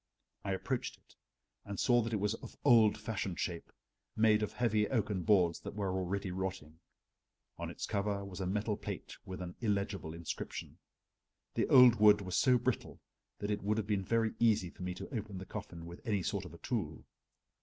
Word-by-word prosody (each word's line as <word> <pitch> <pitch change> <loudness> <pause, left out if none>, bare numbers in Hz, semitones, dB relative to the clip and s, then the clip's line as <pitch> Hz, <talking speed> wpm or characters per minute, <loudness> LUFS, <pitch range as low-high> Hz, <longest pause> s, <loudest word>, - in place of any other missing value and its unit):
I 100 - -1
approached 95 - -2
it - - -26 0.5
and 100 -1 -6
saw 120 -1 +4
that 115 0 -3
it - - +1
was 105 +2 +1
of - - -9
old 115 -6 +6
fashioned 100 -5 -3
shape, 85 -2 -3 0.4
made 110 -1 +4
of 105 - -2
heavy 110 -3 +2
oaken 105 -6 0
boards 90 -5 +3
that - - -8
were 100 -3 -1
already 95 +1 -2
rotting. 90 -4 -4 0.8
On - - -3
its - - -5
cover 100 -1 -1
was 95 -1 -8
a 95 - -2
metal 105 +2 0
plate - - -6
with 95 -1 -6
an 90 0 -6
illegible 100 -6 -1
inscription. 85 -1 -6 0.7
The - - +1
old 125 -2 +8
wood 105 -1 +7
was 90 -2 -3
so 130 -1 +5
brittle 125 0 -2 0.4
that 105 +1 -3
it 105 - -1
would 105 +2 0
have 110 - 0
been 105 -2 0
very 115 +2 +1
easy 105 -7 +3
for - - -15
me 90 0 -3
to 130 - -7
open 105 -3 -4
the 95 - -6
coffin 85 -2 -7
with 85 +1 -9
any 105 -6 0
sort 100 -1 -2
of 90 - -10
a - - -11
tool. 90 -8 -3
100 Hz, 195 wpm, -34 LUFS, 95-110 Hz, 0.8 s, old